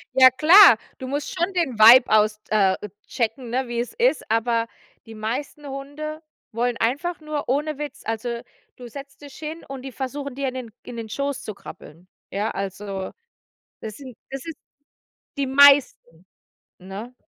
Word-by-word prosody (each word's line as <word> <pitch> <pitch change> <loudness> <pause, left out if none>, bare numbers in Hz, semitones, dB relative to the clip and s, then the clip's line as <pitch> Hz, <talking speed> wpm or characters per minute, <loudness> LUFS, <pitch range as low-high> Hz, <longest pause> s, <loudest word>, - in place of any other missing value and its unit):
Ja, 260 0 +9
klar, 315 - +8 0.2
du 260 - -6
musst 285 +2 -4
schon 360 +2 -1
den 280 -11 -1
Vibe 235 +2 +8
aus 215 0 +2
äh, 195 -3 +3 0.3
checken, 235 +1 -3
ne, 255 +2 -1
wie 240 0 -3
es 240 - -4
ist, 470 - +1
aber 230 +1 +1 0.4
die 225 - -10
meisten 255 +7 -5
Hunde 290 +3 -7 0.3
wollen 235 +1 -1
einfach 290 +10 -1
nur 305 -4 -5
ohne 295 +2 -1
Witz, 295 -3 -7
also, 235 +1 -3 0.3
du 245 - -11
setzt 275 +3 -11
dich 285 -2 -11
hin 315 +1 -7
und 270 -2 -7
die 270 - -8
versuchen 275 +1 -5
dir 275 -1 -2
in - - -9
den 250 -3 -7
in 240 - -9
den 225 -1 -6
Schoß 280 +3 -3
zu 215 - -7
krabbeln. 170 -2 -13 0.2
Ja, 210 +3 -2
also, 195 0 -5 0.7
das 215 -1 -8
sind 260 -5 -11
das 270 -1 -6
ist 325 -3 -7 0.8
die 280 - 0
meisten, 270 - +4 0.5
ne? 195 +6 -9
255 Hz, 165 wpm, -23 LUFS, 225-285 Hz, 0.8 s, Ja